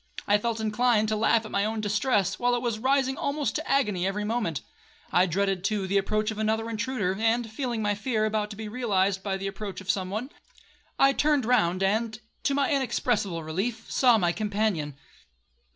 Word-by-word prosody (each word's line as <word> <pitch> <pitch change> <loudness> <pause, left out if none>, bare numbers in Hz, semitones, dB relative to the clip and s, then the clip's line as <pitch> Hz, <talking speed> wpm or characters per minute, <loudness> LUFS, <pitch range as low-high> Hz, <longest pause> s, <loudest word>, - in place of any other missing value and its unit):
I 205 +1 +4
felt 230 +1 -2
inclined 220 0 +2
to 215 - +1
laugh 225 +1 +2
at - - -8
my 200 - +1
own 220 +1 -1
distress, 205 -2 +1
while 245 0 +2
it 240 - -2
was 230 -3 -1
rising 265 +2 +1
almost 285 0 -1
to 315 - -4
agony 210 -10 +1
every 205 +2 -2
moment. 215 - -1 0.5
I 180 +1 +4
dreaded, 190 +1 0
too, 200 -1 0
the 195 +1 +2
approach 215 +2 0
of 215 - -6
another 220 +1 0
intruder, 220 -4 -1
and 225 0 +1
feeling 235 -2 -2
my 205 0 +1
fear 215 +1 -1
about 215 -1 -1
to 210 - -7
be 220 +1 -6
realized 200 -4 0
by 195 -1 -2
the 195 - -6
approach 195 0 -5
of 190 0 0
some 190 -1 -3
one, 225 +8 -4 0.7
I 275 0 +5
turned 290 -3 +2
round, 195 -6 +2
and, 220 +3 0 0.2
to 280 - 0
my 280 +1 +1
inexpressible 235 - 0
relief, 195 +9 -3
saw 245 -3 +5
my 175 -4 +2
companion. 205 -8 -1
215 Hz, 195 wpm, -27 LUFS, 195-240 Hz, 0.7 s, I